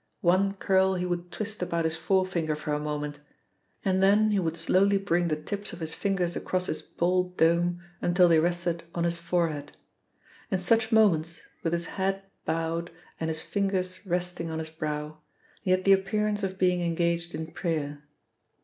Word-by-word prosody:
One 190 +3 +3
curl 190 -1 +3
he 180 0 -1
would 175 0 -3
twist 215 -1 -5
about 170 -2 0
his 160 0 0
forefinger 170 -2 +1
for 150 0 -3
a 150 - 0
moment, 150 -1 -3 0.7
and 190 -1 +2
then 210 +2 +5
he 205 - +2
would 165 -2 -1
slowly 195 +4 +3
bring 175 -3 +1
the 155 - +1
tips 200 +7 -4
of 175 - -8
his 160 -1 -3
fingers 185 -4 0
across 185 0 -1
his 155 - -3
bald 180 +1 0
dome 170 +1 +2 0.2
until 175 +1 +4
they 165 -2 +5
rested 170 0 0
on 170 - 0
his 170 0 0
forehead. 170 -4 -1 0.7
In 190 - +1
such 225 +5 +2
moments, 170 -7 +3 0.2
with 165 - -1
his 170 0 0
head 195 +1 -2 0.2
bowed 165 +1 -1 0.3
and 160 - -1
his 160 0 -2
fingers 190 -2 -1
resting 175 -1 -1
on 160 - -3
his 160 0 -5
brow, 150 -1 -4 0.4
he - - -4
had 185 0 +3
the 195 - +7
appearance 210 +2 +1
of 190 -1 -3
being 180 -1 +2
engaged 170 0 0
in 160 0 -5
prayer. 150 -4 -2
175 Hz, 175 wpm, -28 LUFS, 165-190 Hz, 0.7 s, the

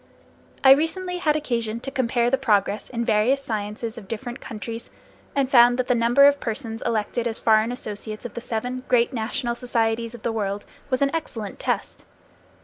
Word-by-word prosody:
I 265 - +9
recently 360 +5 +2
had 305 -3 +2
occasion 235 -6 -2
to 270 - -6
compare 245 -2 +1
the 270 - +3
progress 210 -5 +1
in 235 -1 -2
various 225 +4 +3
sciences 215 +1 -4
of 200 - -14
different 240 +3 -6
countries, 225 +2 -7 0.5
and 275 -2 +2
found 245 -2 +6
that 255 - 0
the 250 - +2
number 240 +4 +5
of 285 0 +5
persons 225 0 -4
elected 230 +1 -1
as 225 - -3
foreign 220 +1 +3
associates 215 -2 -6
of 240 - -6
the 235 - -6
seven 245 +3 -3
great 245 +1 +3
national 240 +1 -2
societies 230 -1 -1
of 225 - -13
the 235 - 0
world 205 -2 -2 0.2
was 255 0 +1
an 275 - +1
excellent 225 -11 -4
test. - - -2
235 Hz, 180 wpm, -24 LUFS, 220-255 Hz, 0.5 s, I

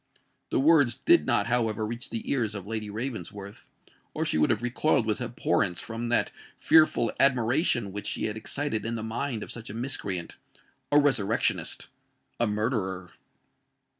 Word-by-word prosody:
The - - +1
words 145 -4 +5
did 340 0 +3
not, - - +2
however, 115 -2 0
reach 120 +4 -5
the 115 - -5
ears 115 -6 0
of 100 -2 -6
Lady 110 0 -4
Ravensworth,—or 105 -2 -7
she 80 - +1
would 75 - +3
have - - 0
recoiled 125 0 +2
with 110 +2 -1
abhorrence 115 -6 0
from 115 +1 -5
that 120 - +2 0.3
fearful 155 -8 +4
admiration 125 - +2
which 105 +1 -5
she - - -2
had 105 - -3
excited 110 +1 -2
in 115 +1 -3
the 110 - -4
mind 115 +1 -3
of - - -8
such 115 -1 -7
a 105 - -7
miscreant—a 115 +2 -4
resurrectionist—a 120 -2 -1
murderer! 105 -4 -2
115 Hz, 145 wpm, -27 LUFS, 105-125 Hz, 0.3 s, words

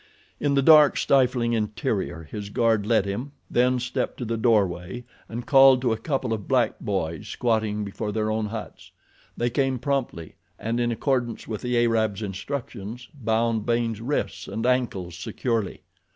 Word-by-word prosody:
In 140 -1 +1
the 140 - +3
dark, 150 -1 +7
stifling 125 -3 +2
interior 105 -6 -2
his 100 +6 -7
guard 110 -2 +1
led 110 -4 +3
him, 120 +9 -4 0.2
then 125 +1 +3
stepped 125 +1 -2
to 125 - -4
the 115 +1 -1
doorway 105 -2 +1 0.3
and 120 +2 -5
called 135 -1 +7
to 120 - +2
a - - -3
couple 130 -3 -1
of 105 -2 -5
black 130 -3 +1
boys 85 -7 -3
squatting 110 -3 0
before 105 +2 -4
their 110 0 -1
own 110 0 -1
huts. 110 0 -8 0.5
They 120 0 0
came 135 0 +1
promptly 125 - -2 0.2
and 115 +3 -2
in 120 0 +1
accordance 120 -1 -1
with 110 -2 -4
the 125 -1 0
Arab's 110 -2 0
instructions 115 +2 -6
bound 115 -4 0
Baynes' 115 -2 0
wrists 140 +5 -2
and 110 +4 -3
ankles 115 -9 0
securely. 110 +4 -3
115 Hz, 160 wpm, -25 LUFS, 105-125 Hz, 0.5 s, dark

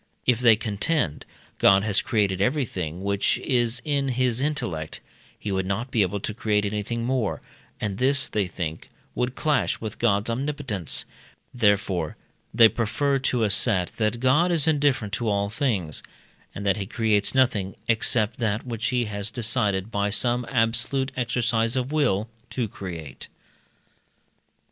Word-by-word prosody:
If, 125 -2 +3
they 115 -3 +6
contend, 105 - -1 0.3
God 100 0 +5
had 105 -1 +1
created 100 -4 0
everything 95 - -1
which 100 +3 +1
is 120 -1 0
in 140 -2 0
his 125 -1 0
intellect, 120 - -2 0.4
he 105 - -5
would 95 -1 -1
not 110 +7 -2
be 115 - +2
able 100 +1 0
to 105 - -3
create 105 -1 0
anything 105 +3 -3
more, 125 -5 -1 0.4
and 100 -2 -3
this, 130 +1 +4
they 105 -3 -1
think, 85 -3 -5 0.2
would 125 +1 -2
clash 150 -2 0
with 110 -1 -6
God's 105 -2 +2
omnipotence; 130 - -2 0.5
therefore, 100 -8 +1 0.3
they 115 0 +7
prefer 135 +6 0
to 125 -3 +1
asset 100 -3 +2
that 110 +1 0
God 145 +8 +3
is 165 -3 +3
indifferent 140 -9 +1
to 115 -2 -1
all 100 0 0
things, 105 - -1 0.5
and 100 - -5
that 100 0 +2
he 100 -2 -4
creates 110 0 +1
nothing 115 -8 +2
except 115 0 +1
that 110 -1 -1
which 115 -3 -3
he 125 -1 +1
has 100 -1 -3
decided, 110 -4 0
by 100 -1 0
some 120 +3 0
absolute 125 +3 0
exercise 115 -1 0
of 130 +1 -1
will, 125 -9 +1 0.2
to 125 -3 -2
create. 85 -8 -8
115 Hz, 150 wpm, -25 LUFS, 100-125 Hz, 0.5 s, they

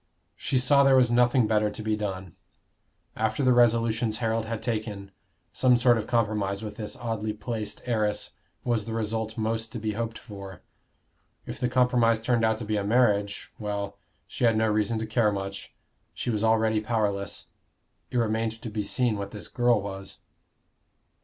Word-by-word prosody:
She 135 - -1
saw 140 +3 +5
there 135 -1 +6
was 125 -2 +4
nothing 120 0 +4
better 105 -1 +2
to 110 - -7
be 110 0 +1
done. 95 -4 -5 0.8
After 110 +4 0
the 130 -1 +5
resolutions 115 -2 +3
Harold 115 0 0
had 115 -1 -4
taken, 105 -4 -3 0.4
some 125 -1 +4
sort 120 0 +5
of 110 -2 -3
compromise 105 -4 0
with 105 -1 -6
this 105 -2 -5
oddly 110 -2 -3
placed 105 -1 -5
heiress 110 -4 0 0.3
was 115 -4 0
the 115 -1 -4
result 110 0 -2
most 110 0 -1
to 120 - -4
be 110 0 -2
hoped 115 +1 -3
for; 100 -4 -10 0.8
if - - -7
the 125 - 0
compromise 125 -2 +3
turned 115 0 +1
out 110 0 +2
to 110 - -6
be 105 0 -1
a 100 - -1
marriage 105 -2 +1
well, 100 -1 -4 0.3
she - - -6
had 115 -2 +4
no 110 0 +2
reason 110 +1 +1
to 110 - -2
care 110 -1 +2
much: 100 -1 -5 0.4
she 120 - -2
was 110 -1 -1
already 110 -1 +3
powerless. 105 -3 -2 0.6
It - - -2
remained 115 -1 0
to 115 - -5
be 105 -1 -2
seen 115 -1 0
what 100 0 -4
this 105 0 -8
girl 120 -2 +2
was. 95 -1 -6
110 Hz, 175 wpm, -27 LUFS, 105-115 Hz, 0.8 s, there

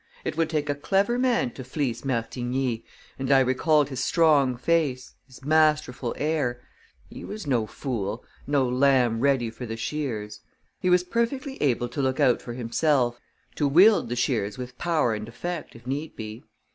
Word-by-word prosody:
It - - -2
would 165 0 +1
take 150 -2 -1
a 145 - +1
clever 195 +11 +1
man 245 - +1
to 130 - -9
fleece 125 -2 -3
Martigny, 125 -1 -2 0.4
and 135 +1 -1
I 135 - +7
recalled 145 +3 +2
his 130 -2 -3
strong 145 -7 +3
face, 135 -2 0
his 130 0 -15
masterful 150 -5 +2
air 145 -6 -1 0.5
he - - -10
was 210 -3 -7
no 120 -6 +1
fool, 115 -4 -4 0.2
no 140 -2 +2
lamb 125 -2 +3
ready 130 -3 +2
for 120 +2 -8
the 115 0 -5
shears. 115 -5 -4 0.4
He 185 - 0
was 180 0 +4
perfectly 260 +7 -2
able 120 -4 +1
to 140 - -3
look 130 -1 0
out 125 - +3
for 120 - -7
himself 120 +1 +1 0.3
to 145 - 0
wield 180 - +5
the 120 - -2
shears 110 -5 -1
with 125 -1 -8
power 155 -9 +1
and 105 +1 -5
effect, 175 +6 -6
if 115 0 -14
need 145 +5 -4
be. 110 +1 -7
130 Hz, 170 wpm, -25 LUFS, 120-155 Hz, 0.5 s, I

